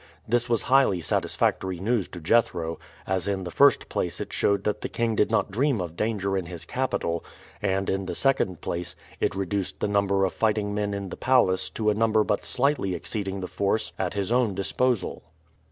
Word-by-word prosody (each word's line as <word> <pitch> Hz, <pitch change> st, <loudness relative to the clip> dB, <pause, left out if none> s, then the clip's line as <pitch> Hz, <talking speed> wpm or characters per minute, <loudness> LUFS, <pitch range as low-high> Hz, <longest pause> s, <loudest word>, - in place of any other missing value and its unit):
This 120 Hz, +1 st, +1 dB
was 115 Hz, -2 st, +2 dB
highly 130 Hz, -8 st, +4 dB
satisfactory 90 Hz, +2 st, 0 dB
news 110 Hz, 0 st, 0 dB
to 90 Hz, -, -9 dB
Jethro, 85 Hz, -3 st, +1 dB, 0.3 s
as 95 Hz, -1 st, -1 dB
in 95 Hz, -2 st, -1 dB
the 90 Hz, -, -5 dB
first -, -, +4 dB
place -, -, -2 dB
it -, -, -5 dB
showed 100 Hz, -1 st, +1 dB
that 105 Hz, -, -1 dB
the -, -, -3 dB
king 115 Hz, -1 st, 0 dB
did 105 Hz, -, +2 dB
not -, -, +1 dB
dream 130 Hz, +3 st, +1 dB
of 85 Hz, -2 st, -4 dB
danger 100 Hz, -2 st, -1 dB
in 95 Hz, -3 st, -2 dB
his 85 Hz, -1 st, -7 dB
capital; 85 Hz, -8 st, -1 dB, 0.4 s
and, 95 Hz, -1 st, 0 dB
in 95 Hz, -1 st, -1 dB
the -, -, -3 dB
second 135 Hz, -9 st, +1 dB
place, 85 Hz, 0 st, -4 dB, 0.2 s
it -, -, 0 dB
reduced 95 Hz, 0 st, -2 dB
the -, -, 0 dB
number 100 Hz, -1 st, +2 dB
of 95 Hz, -, -2 dB
fighting 105 Hz, -2 st, 0 dB
men 105 Hz, -1 st, -1 dB
in 100 Hz, -1 st, -5 dB
the -, -, -7 dB
palace 95 Hz, -8 st, +3 dB
to 110 Hz, -1 st, 0 dB
a -, -, +2 dB
number 110 Hz, 0 st, +3 dB
but 105 Hz, -1 st, -1 dB
slightly 130 Hz, -8 st, 0 dB
exceeding 95 Hz, +2 st, -4 dB
the 90 Hz, -, -3 dB
force 105 Hz, +3 st, 0 dB
at 95 Hz, 0 st, -1 dB
his 100 Hz, +1 st, -2 dB
own 120 Hz, -5 st, +2 dB
disposal. 120 Hz, +4 st, 0 dB
100 Hz, 200 wpm, -26 LUFS, 95-110 Hz, 0.4 s, highly